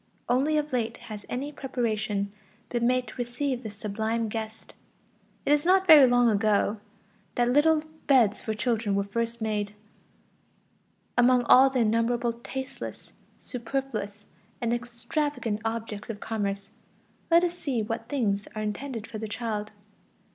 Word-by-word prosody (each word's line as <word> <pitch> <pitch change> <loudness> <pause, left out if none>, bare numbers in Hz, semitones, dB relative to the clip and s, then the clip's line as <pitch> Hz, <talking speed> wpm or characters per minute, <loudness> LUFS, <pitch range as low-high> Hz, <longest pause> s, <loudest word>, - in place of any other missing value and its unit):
Only 275 +5 +2
of 300 -2 -2
late 235 -3 -1
has 210 -2 -9
any 275 +4 -3
preparation 220 -7 -2 0.4
been 235 -1 +1
made 255 0 +2
to - - -11
receive 245 +1 -2
this 215 -3 -7
sublime 220 +2 -2
guest. 220 0 -6 0.7
It 290 - +4
is 295 0 +3
not 375 +2 +4
very 305 -6 +9
long 245 0 +4
ago 215 0 +2 0.6
that 240 0 +2
little 305 +3 +4 0.2
beds 230 -7 +4
for 220 - -3
children 225 -3 0
were 200 - +2
first 230 +3 -3
made; 210 -1 -2 1.4
among 245 0 +5
all 260 +3 +7
the 260 -2 0
innumerable 230 +2 +1
tasteless, 265 +3 -7 0.3
superfluous, 230 -5 -4 0.3
and 235 -1 0
extravagant 240 -1 -2
objects 225 -2 -4
of 215 -2 -5
commerce, 200 -3 -3 0.6
let 335 +1 +6
us 350 -1 0
see 265 -9 -2
what 225 +2 -4
things 215 -8 0
are 215 - -2
intended 225 +2 -4
for 225 -2 -7
the 220 - -4
child. 210 -1 -3
235 Hz, 140 wpm, -27 LUFS, 215-260 Hz, 1.4 s, very